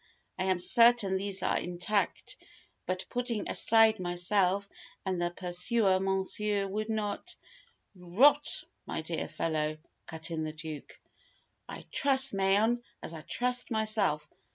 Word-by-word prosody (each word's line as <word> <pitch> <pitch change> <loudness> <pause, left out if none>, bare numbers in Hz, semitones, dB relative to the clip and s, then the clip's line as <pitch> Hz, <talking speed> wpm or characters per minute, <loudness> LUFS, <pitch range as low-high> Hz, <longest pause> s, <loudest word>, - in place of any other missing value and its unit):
I 185 - -1
am 185 -1 0
certain 230 0 +5
these 195 0 -3
are - - +1
intact. 180 +4 -2 0.5
But, 185 0 -3
putting 245 -3 -3
aside 225 -1 +4
myself 185 +2 0 0.4
and 185 -2 -2
the 175 - 0
Pursuer, 185 +3 +1
Monsieur 195 +2 0
would 215 +3 -4
not 220 - -3 0.4
" - - -45 0.2
"Rot, 290 +3 +5 0.2
my - - -4
dear - - -4
fellow!" 155 -1 -2 0.3
cut 160 0 -2
in 160 -1 -3
the 155 0 -5
Duke. 155 -1 -9 0.7
"I - - -9
trust 270 -2 +4
Mayen 200 +5 +1 0.2
as - - -5
I 160 - -8
trust 250 +7 0
myself. 215 -9 +1
195 Hz, 130 wpm, -29 LUFS, 175-220 Hz, 0.7 s, certain